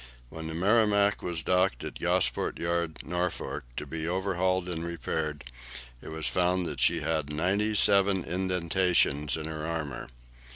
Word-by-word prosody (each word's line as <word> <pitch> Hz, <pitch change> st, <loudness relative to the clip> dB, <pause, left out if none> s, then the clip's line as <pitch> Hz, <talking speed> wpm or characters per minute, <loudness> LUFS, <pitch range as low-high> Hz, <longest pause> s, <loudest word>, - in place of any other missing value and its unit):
When 80 Hz, +2 st, -7 dB
the 80 Hz, -, -5 dB
"Merrimac" 100 Hz, +2 st, +3 dB
was 85 Hz, -2 st, -3 dB
docked 90 Hz, +1 st, +2 dB
at -, -, -6 dB
Gosport -, -, +1 dB
Yard, 85 Hz, -2 st, -2 dB
Norfolk, 90 Hz, -5 st, -3 dB
to -, -, -3 dB
be 80 Hz, 0 st, -4 dB
overhauled 95 Hz, 0 st, 0 dB
and 85 Hz, -2 st, -3 dB
repaired, 80 Hz, -3 st, -3 dB, 0.6 s
it -, -, -11 dB
was 80 Hz, 0 st, -4 dB
found 90 Hz, 0 st, +2 dB
that -, -, -4 dB
she -, -, +3 dB
had 80 Hz, -2 st, -1 dB
ninety 100 Hz, +7 st, +1 dB
seven 100 Hz, -2 st, +3 dB
indentations 90 Hz, -4 st, +1 dB
on 80 Hz, -, -5 dB
her 80 Hz, -1 st, -5 dB
armour. 80 Hz, -4 st, -4 dB
85 Hz, 150 wpm, -29 LUFS, 80-95 Hz, 0.6 s, Merrimac